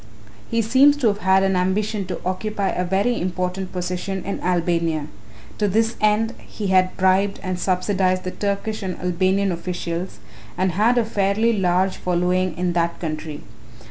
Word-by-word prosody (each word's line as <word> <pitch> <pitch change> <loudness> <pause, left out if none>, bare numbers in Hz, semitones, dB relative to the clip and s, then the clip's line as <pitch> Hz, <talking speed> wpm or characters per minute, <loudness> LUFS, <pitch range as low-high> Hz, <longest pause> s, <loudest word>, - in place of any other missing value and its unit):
"He 230 0 +1
seems 270 +6 +5
to 250 -6 +3
have 205 0 -2
had 190 0 +3
an 195 -1 +2
ambition 195 +2 0
to 185 - -4
occupy 195 +2 -1
a 180 - -1
very 200 +7 0
important 180 +1 -2
position 180 +1 -3
in 200 - -3
Albania. 170 -3 0 0.5
To 210 - +2
this 225 +3 +1
end 215 +2 +2
he 205 -3 -5
had 185 -1 +3
bribed 190 +1 +2
and 185 -2 -3
subsidized 185 0 +1
the 185 - -3
Turkish 205 +2 -2
and 185 -2 -4
Albanian 185 +2 +1
officials 175 0 -4 0.4
and 185 0 +1
had 220 +7 +2
a 235 - +3
fairly 210 +2 +1
large 185 0 +1
following 180 -1 0
in 180 0 0
that 170 0 0
country. 155 -2 -5
185 Hz, 160 wpm, -22 LUFS, 180-205 Hz, 0.5 s, seems